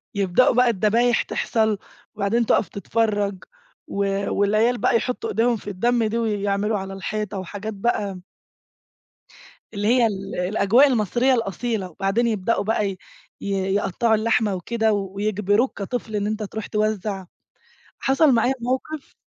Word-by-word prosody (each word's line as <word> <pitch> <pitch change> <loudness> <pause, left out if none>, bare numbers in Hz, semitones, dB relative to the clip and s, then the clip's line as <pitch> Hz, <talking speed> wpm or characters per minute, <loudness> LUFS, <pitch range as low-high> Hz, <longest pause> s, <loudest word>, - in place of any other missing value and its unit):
يبدأوا 200 +6 +3
بقى 250 -1 +5
الدبايح 230 +3 +2
تحصل 220 -2 0 0.4
وبعدين 215 +3 +1
تقف 215 - +2
تتفرج 205 -1 -1 0.4
و 200 0 -1
والعيال 215 +4 +2
بقى 240 - +2
يحطوا 255 - -3
ايديهم 235 - +2
في 205 - -8
الدم 235 +5 +1
دي 220 +2 -1
ويعملوا 205 -1 0
على 195 0 -6
الحيطة 210 +1 -4
وحاجات 205 +4 -6
بقى 200 -2 -1 1.5
اللي 205 +1 -1
هي 240 0 +4
ال 195 -2 -5
الأجواء 200 +8 +4
المصرية 245 +2 +2
الأصيلة، 225 -3 -2
وبعدين 195 +7 0
يبدؤوا 220 0 0
بقى 210 -1 0
ي 190 - -6 0.4
يقطعوا 195 +3 0
اللحمة 220 -2 +1
وكده 220 +4 0
ويجبروك 205 +3 0
كطفل 220 +1 -4
إن 205 0 0
أنت 215 0 -2
تروح 215 +1 -6
توزع، 210 -2 -1 0.8
حصل 270 +1 +4
معايا 245 +3 +2
موقف 260 +5 -4
215 Hz, 130 wpm, -23 LUFS, 200-235 Hz, 1.5 s, بقى